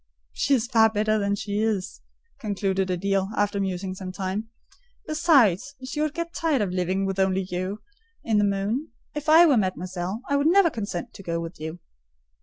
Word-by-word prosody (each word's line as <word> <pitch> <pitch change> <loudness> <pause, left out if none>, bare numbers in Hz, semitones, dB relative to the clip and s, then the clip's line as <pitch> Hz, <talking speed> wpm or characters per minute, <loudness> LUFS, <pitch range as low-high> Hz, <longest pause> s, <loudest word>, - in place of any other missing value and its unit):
"She 280 - +2
is 235 -3 0
far 225 -3 +4
better 215 0 +1
as 200 0 0
she 205 0 -2
is," 210 -4 -2 0.4
concluded 195 -3 -1
Adèle, 195 +1 0
after 205 0 +1
musing 190 -1 -2
some 185 0 -6
time: 195 +4 -4 0.6
"besides, 280 - +3
she 295 +3 -3
would 305 -1 -1
get 335 0 -4
tired 305 -9 +1
of 190 - -2
living 185 +2 0
with 195 0 -2
only 190 0 +1
you 185 +4 -3 0.4
in 220 -2 +2
the - - +3
moon. 205 +8 0 0.3
If 300 +1 -3
I 325 +2 +8
were 285 -6 +4
mademoiselle, 185 +2 -2
I 280 - +2
would 285 +2 +2
never 350 -1 +5
consent 200 -7 -5
to - - -11
go 170 -3 -2
with 165 +1 -7
you." 160 +2 -5
200 Hz, 185 wpm, -25 LUFS, 185-255 Hz, 0.6 s, I